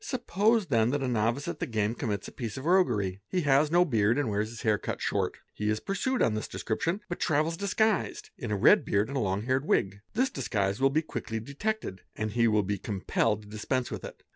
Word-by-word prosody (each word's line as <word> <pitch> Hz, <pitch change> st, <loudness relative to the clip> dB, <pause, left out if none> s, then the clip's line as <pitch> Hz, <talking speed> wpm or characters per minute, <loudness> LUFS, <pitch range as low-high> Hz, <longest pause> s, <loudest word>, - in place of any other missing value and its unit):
Suppose 225 Hz, -, +1 dB
then 115 Hz, -7 st, +2 dB
that 140 Hz, +1 st, 0 dB
a -, -, 0 dB
novice 120 Hz, +3 st, 0 dB
at -, -, -4 dB
the -, -, -2 dB
game 110 Hz, -1 st, 0 dB
commits 105 Hz, -6 st, -3 dB
a -, -, -9 dB
piece 115 Hz, -5 st, -5 dB
of 130 Hz, -, -6 dB
roguery; 110 Hz, -, +2 dB
he 185 Hz, -, 0 dB
has 145 Hz, 0 st, +4 dB
no 175 Hz, +2 st, +4 dB
beard 115 Hz, -5 st, +2 dB
and 140 Hz, -7 st, 0 dB
wears 105 Hz, +1 st, 0 dB
his 115 Hz, +1 st, -9 dB
hair 105 Hz, -3 st, +2 dB
cut -, -, -4 dB
short; -, -, -1 dB, 0.2 s
he 105 Hz, 0 st, -2 dB
is 110 Hz, 0 st, +1 dB
pursued 240 Hz, -, 0 dB
on 110 Hz, -, +2 dB
this 110 Hz, -, -3 dB
description 170 Hz, -, -2 dB
but 175 Hz, -, -5 dB
travels 155 Hz, +2 st, +1 dB
disguised 200 Hz, +2 st, 0 dB
in 120 Hz, -, -6 dB
a 105 Hz, -, 0 dB
red -, -, +6 dB
beard 100 Hz, +3 st, +1 dB
and 140 Hz, -, -3 dB
a -, -, +1 dB
long 100 Hz, 0 st, -1 dB
haired 130 Hz, +2 st, +1 dB
wig. 100 Hz, +1 st, +1 dB
This 260 Hz, +4 st, +2 dB
disguise 100 Hz, -4 st, -1 dB
will 135 Hz, -, +5 dB
be 155 Hz, +4 st, +1 dB
quickly 115 Hz, -7 st, -4 dB
detected 140 Hz, -, -3 dB
and 110 Hz, 0 st, -2 dB
he 115 Hz, +1 st, +3 dB
will 105 Hz, -2 st, +3 dB
be 100 Hz, 0 st, -2 dB
compelled 105 Hz, +2 st, 0 dB
to -, -, -15 dB
dispense 120 Hz, +4 st, -2 dB
_ -, -, -15 dB
with -, -, -5 dB
it. -, -, -9 dB
120 Hz, 240 wpm, -29 LUFS, 105-155 Hz, 0.2 s, red